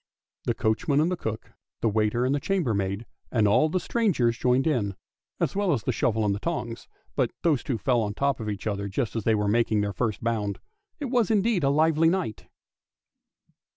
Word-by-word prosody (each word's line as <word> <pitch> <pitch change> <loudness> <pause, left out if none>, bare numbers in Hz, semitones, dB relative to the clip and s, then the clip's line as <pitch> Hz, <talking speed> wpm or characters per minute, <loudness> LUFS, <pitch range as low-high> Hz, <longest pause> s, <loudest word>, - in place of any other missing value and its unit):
The - - 0
coachman 140 +7 +1
and 160 +4 +2
the - - +1
cook, 110 -9 -5 0.3
the - - +2
waiter 110 +3 +1
and 130 - +2
the 145 - +1
chambermaid, 115 - -1 0.3
and 110 -4 +3
all 125 +10 +4
the 185 - 0
strangers 170 - +1
joined 125 +2 +2
in, 115 -11 0 0.4
as - - 0
well 200 -4 +2
as 115 -7 -1
the - - 0
shovel 110 -2 +1
and 100 - +2
the 100 - -3
tongs: 120 -6 -4 0.3
but - - +2
those 155 -7 +3
two 130 -5 -2
fell 120 +2 +1
on 105 -2 -2
the - - -18
top 140 -2 +1
of 110 -2 -4
each 105 -1 -5
other 100 -2 -2
just 110 +4 -2
as 115 - -2
they 110 - +4
were 105 -1 0
making 110 0 +2
their 100 -1 -2
first 110 +2 -2
bound. 105 -4 -1 0.4
It 280 -5 -4
was 240 -5 +2
indeed 215 -4 +2
a 135 - +4
lively 160 +2 +4
night 175 - -2
120 Hz, 210 wpm, -26 LUFS, 105-160 Hz, 0.4 s, all